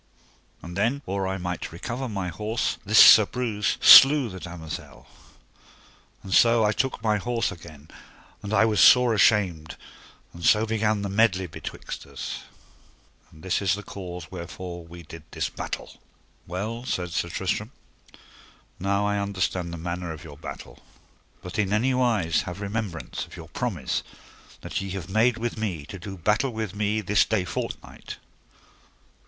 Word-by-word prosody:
And 85 0 -8
then 120 +8 0
or 95 0 -2
I 95 0 -2
might 90 0 -4
recover 120 +10 -5
my 100 -4 -3
horse 110 +6 -2
this 105 +2 +1
Sir 110 -1 +9
Breuse 115 -5 -1
slew 135 -2 +9
the 95 -1 -8
damosel. 85 -3 -8 1.2
And 95 -1 -5
so 115 0 +5
I 105 - +3
took 130 0 -2
my 105 -2 +2
horse 115 +2 -1
again, 80 -5 -12 0.5
and 100 0 -6
I 110 0 +4
was 105 -3 +1
sore 125 -2 +7
ashamed, 100 -7 +2 0.6
and 85 - -11
so 110 +4 +4
began 110 -2 0
the 100 - -3
medley 100 -2 +2
betwixt 80 - -8
us: - - -6 0.9
and 80 - -17
this 95 +1 0
is 95 -1 +2
the 105 - -8
cause 90 -5 -8
wherefore 85 -1 -8
we 85 +1 -11
did 80 +1 -11
this - - -3
battle. - - -7 0.5
Well, 105 +7 -4
said 90 -8 -3
Sir 85 0 -2
Tristram, - - -2 1.1
now 100 +2 0
I 105 0 0
understand 95 -3 -2
the 85 - -6
manner 85 +1 -4
of 80 -1 -9
your 75 -4 -11
battle, - - -9 0.6
but 90 +4 -6
in 100 -2 +1
any 120 +5 +2
wise 110 -11 +1
have 90 +1 -6
remembrance 100 -4 -4
of - - -13
your 80 -1 -10
promise 90 - -2 0.6
that - - -4
ye 95 - -5
have 95 0 -8
made 115 +3 +3
with 115 -1 -4
me 90 -9 -3
to 95 +5 -9
do 95 +2 -8
battle 105 +9 +1
with 110 -5 -4
me 105 +1 -1
this 105 0 +3
day 100 -5 -1
fortnight. - - -6
100 Hz, 160 wpm, -25 LUFS, 90-110 Hz, 1.2 s, Sir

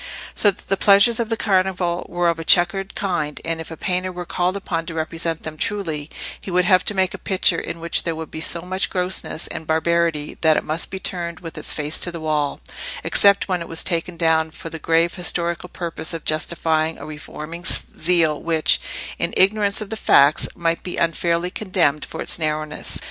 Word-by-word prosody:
So 205 - +4
that 195 - -6
the 195 - +1
pleasures 200 +4 +5
of 230 -2 -1
the 225 - 0
Carnival 185 -4 0
were 175 0 0
of 165 -1 -1
a - - -4
checkered 185 +4 +3
kind, 165 -7 -2
and 165 0 -2
if 160 - -9
a 160 - -8
painter 185 +2 -1
were 180 0 -6
called 180 +3 -1
upon 165 -4 -3
to 165 - -5
represent 165 0 -2
them 155 -1 -6
truly, 160 -6 -3 0.3
he - - -8
would 180 0 +2
have 185 -1 +4
to 210 - +2
make 190 -1 +1
a - - -7
picture 185 -3 +2
in 170 - -6
which 170 0 +1
there 165 -2 -3
would 160 0 -7
be 160 - -6
so 170 +1 0
much 185 +2 -1
grossness 180 -3 -1
and 160 - -7
barbarity 160 -1 0
that 160 -1 +5
it - - -1
must 155 +2 -2
be 190 - -5
turned 170 -3 -4
with 165 -2 -8
its - - -3
face 150 +1 -2
to 175 - +2
the 170 - -6
wall, 150 -2 -1 0.4
except 200 -1 +4
when 180 -3 -1
it 170 - -6
was 165 - +1
taken 170 0 -1
down 160 -1 +2
for 160 +1 -9
the 165 - -6
grave 165 +2 +2
historical 175 -1 -1
purpose 170 -1 0
of 165 - -8
justifying 160 0 0
a - - -9
reforming 155 +2 -8
zeal 165 -2 +2
which, 160 -2 +2 0.4
in - - -1
ignorance 200 +1 +3
of 215 - -7
the - - -2
facts, 150 -6 +4
might 165 -1 -1
be 180 - -5
unfairly 170 +1 0
condemned 180 -8 0
for - - -6
its - - +3
narrowness. 155 -1 -3
170 Hz, 210 wpm, -21 LUFS, 160-185 Hz, 0.4 s, pleasures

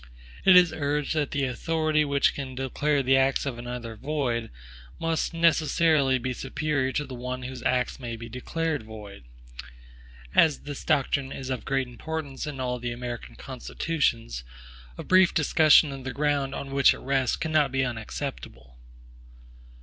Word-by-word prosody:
It 190 -1 +8
is 180 -3 +7
urged 145 -1 -1
that 150 -3 0
the 145 - -1
authority 155 +4 0
which 140 -1 +2
can 130 -2 -6
declare 140 +2 0
the 135 +1 +4
acts 135 +1 +2
of 125 -4 -4
another 120 -2 -6
void, 125 -2 -2 0.5
must 165 -1 -1
necessarily 160 -4 +3
be 130 +1 -3
superior 135 +1 -1
to 150 - -1
the 130 - -9
one 125 +1 -5
whose 130 0 -6
acts 125 +2 0
may 120 -3 -5
be 115 +1 -8
declared 150 +6 -3
void. 105 - -11 1.1
As 160 -3 +4
this 145 -1 -7
doctrine 135 -1 +1
is 130 0 -5
of 130 - -4
great 135 -1 0
importance 150 +3 -5
in 145 -3 -6
all 125 -1 -2
the 120 0 -3
American 120 0 -6
constitutions, 125 - -2 0.5
a - - -6
brief 185 -1 +4
discussion 155 -1 +5
of 135 -1 -7
the 130 - -4
ground 145 -2 0
on 135 - -6
which 140 -1 +5
it - - -11
rests 135 -1 +1
cannot 155 -4 +1
be 130 0 +1
unacceptable. 110 - -6
135 Hz, 155 wpm, -26 LUFS, 125-150 Hz, 1.1 s, It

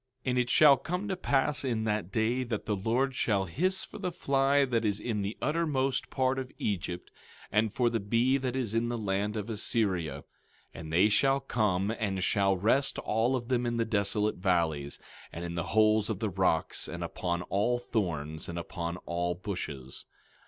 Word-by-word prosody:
17:18 - - 0
And 125 - 0
it 125 -1 0
shall 140 +1 +7
come 180 +9 -3
to 190 - 0
pass 140 -5 +1
in 115 -5 -1
that 105 -4 -1
day 115 +4 +1
that 115 -4 -4
the 105 - 0
Lord 120 +7 0
shall 100 -6 +1
hiss 185 - 0
for - - -10
the 185 -3 -2
fly 140 -3 +2
that 120 -3 0
is 105 -1 0
in 110 -3 -2
the 100 +2 -3
uttermost 150 -4 0
part 130 0 +1
of 130 -1 -6
Egypt, 90 -3 -3 0.4
and 105 +1 +2
for 120 +2 +1
the 115 -1 +1
bee 115 +6 +2
that 130 -2 -3
is 120 -5 -2
in 115 +1 +1
the 120 - -2
land 105 0 -1
of 105 0 -4
Assyria. 95 - 0 0.5
17:19 - - -9
And 80 -1 -7
they 90 +5 +5
shall 135 +6 +3
come, 105 -7 0
and 95 -4 -1
shall 100 -2 +2
rest 125 +9 +2
all 115 +4 +1
of 120 -1 -4
them 125 -1 +1
in 120 0 -1
the 115 - +1
desolate 105 -1 +1
valleys, 85 -6 0 0.3
and 85 +1 -6
in 85 - -5
the 85 -1 -2
holes 110 0 +4
of 110 - -1
the 105 0 -2
rocks, 90 -3 0
and - - -5
upon 85 -1 -2
all 105 +7 +1
thorns, 80 -11 -3
and 85 - -5
upon 85 0 -4
all 85 0 -1
bushes. 75 -8 -6
110 Hz, 195 wpm, -30 LUFS, 95-130 Hz, 0.5 s, shall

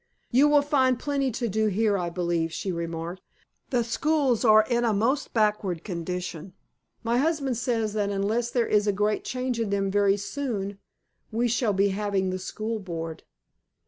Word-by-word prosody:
"You 270 +5 +5
will 295 -1 +5
find 260 -3 +2
plenty 280 0 -1
to 235 +1 -2
do 215 +1 +1
here, 210 +1 +2
I 175 -3 -1
believe," 170 -2 -1
she 190 - -3
remarked. 170 +1 -4 0.5
"The 245 -2 +1
schools 265 0 +1
are 215 -2 +6
in 240 -1 +1
a 230 -2 +2
most 250 +8 0
backward 210 -6 0
condition. 180 -1 -5 0.5
My 235 +1 +1
husband 285 -4 0
says 225 -3 -1
that 205 -2 0
unless 210 +4 0
there 240 -1 +1
is 210 -1 +2
a - - +4
great 210 +2 0
change 255 -1 -2
in 225 -3 -1
them 195 -1 0
very 200 0 +3
soon 200 -3 -4 0.5
we 235 +2 +1
shall 230 -2 +1
be 200 +1 +3
having 195 -1 -1
the 185 - -3
School 220 +4 -4
Board." 165 -4 -6
215 Hz, 175 wpm, -26 LUFS, 190-240 Hz, 0.5 s, are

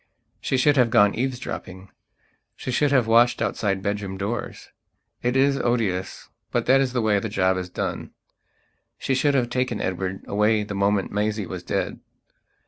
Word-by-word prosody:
She 130 - -1
should 145 +3 +3
have 125 -2 +4
gone 105 -4 +4
eavesdropping; 115 -7 -5 0.6
she 130 - -5
should 145 +3 +2
have 130 -4 +4
watched 115 +2 +4
outside 95 -2 -1
bedroom 100 -1 -3
doors. 105 +5 -5 0.5
It 125 +1 0
is 135 +1 +3
odious; 105 -6 -1 0.2
but - - -1
that 135 +2 +5
is 130 -2 -1
the 120 -3 0
way 105 -2 +3
the 110 - -4
job 95 -2 +1
is 90 -1 -4
done. - - -4 0.9
She 135 - -1
should 140 +2 +2
have 120 -3 +1
taken 125 -3 -1
Edward 95 +1 -3
away 105 +1 +2
the 105 - -6
moment 100 0 +1
Maisie 105 0 -1
was 90 0 -6
dead. - - -3
110 Hz, 165 wpm, -24 LUFS, 100-125 Hz, 0.9 s, that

